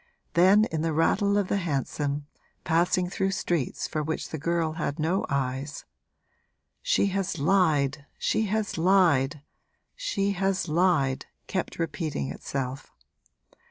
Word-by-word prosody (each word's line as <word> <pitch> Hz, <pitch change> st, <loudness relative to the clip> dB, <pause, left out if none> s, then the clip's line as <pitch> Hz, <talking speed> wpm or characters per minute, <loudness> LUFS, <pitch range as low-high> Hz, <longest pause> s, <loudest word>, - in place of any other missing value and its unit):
Then, 190 Hz, +5 st, +6 dB
in 160 Hz, -1 st, -1 dB
the 165 Hz, 0 st, 0 dB
rattle 200 Hz, +6 st, +2 dB
of 200 Hz, -2 st, +1 dB
the 200 Hz, -, +1 dB
hansom, 145 Hz, -3 st, -2 dB, 0.4 s
passing 175 Hz, +2 st, +2 dB
through 190 Hz, +2 st, -1 dB
streets 175 Hz, -7 st, -1 dB
for 155 Hz, -, -2 dB
which 155 Hz, +1 st, -3 dB
the 160 Hz, -, -5 dB
girl 165 Hz, +1 st, 0 dB
had 150 Hz, -2 st, -3 dB
no 165 Hz, +4 st, 0 dB
eyes, 140 Hz, +1 st, -2 dB, 1.0 s
'She -, -, +2 dB
has 195 Hz, -2 st, -1 dB
lied, 150 Hz, -4 st, +2 dB
she 220 Hz, -, +1 dB
has 210 Hz, -3 st, -1 dB
lied, 160 Hz, -6 st, +3 dB, 0.5 s
she 200 Hz, -, -1 dB
has 195 Hz, -1 st, 0 dB
lied!' 155 Hz, -5 st, +2 dB, 0.2 s
kept 185 Hz, -, -3 dB
repeating 155 Hz, -, -2 dB
itself. 130 Hz, -, -5 dB
165 Hz, 125 wpm, -27 LUFS, 145-190 Hz, 1.0 s, Then